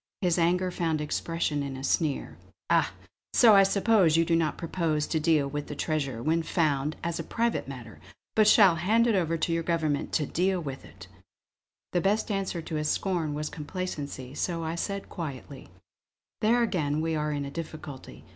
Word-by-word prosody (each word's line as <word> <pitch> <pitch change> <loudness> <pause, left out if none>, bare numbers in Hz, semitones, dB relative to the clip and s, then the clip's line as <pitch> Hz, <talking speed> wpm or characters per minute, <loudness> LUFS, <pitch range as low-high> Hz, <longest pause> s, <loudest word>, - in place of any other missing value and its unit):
His 175 -2 +2
anger 180 +2 +2
found 165 -3 -1
expression 150 0 -1
in 140 -1 -4
a 135 - -8
sneer: 145 0 0 0.4
"Ah! - - +3 0.4
so 230 -3 +7
I 200 - +8
suppose 195 -4 +3
you 165 - +3
do 165 0 +2
not 165 -2 0
propose 165 -3 -1
to 160 - -1
deal 155 -2 +2
with 145 +1 -4
the 150 - -6
treasure, 140 -6 -2
when 165 +2 +2
found, 150 -3 0
as 170 0 -2
a - - -2
private 235 - -1
matter; 125 -5 -9 0.3
but 215 -1 +4
shall 200 -5 +6
hand 215 +8 +3
it 235 - +3
over 165 -4 +1
to 165 +1 0
your 165 - +1
government 160 -4 -1
to 155 - +1
deal 185 +5 0
with!" 140 -5 -7 1.1
The 175 - +2
best 210 +4 +1
answer 190 -4 -2
to 160 - -5
his 150 0 -1
scorn 170 -6 -1
was 150 0 -3
complacency; 150 -5 -5
so 165 +2 -2
I 160 0 -2
said 200 +3 -3
quietly: 140 -4 -7 0.7
"There 235 +2 +3
again 155 -9 0
we 160 0 -1
are 150 0 -1
in 145 -1 -2
a 140 - -6
difficulty. 155 -4 -8
165 Hz, 185 wpm, -28 LUFS, 150-180 Hz, 1.1 s, I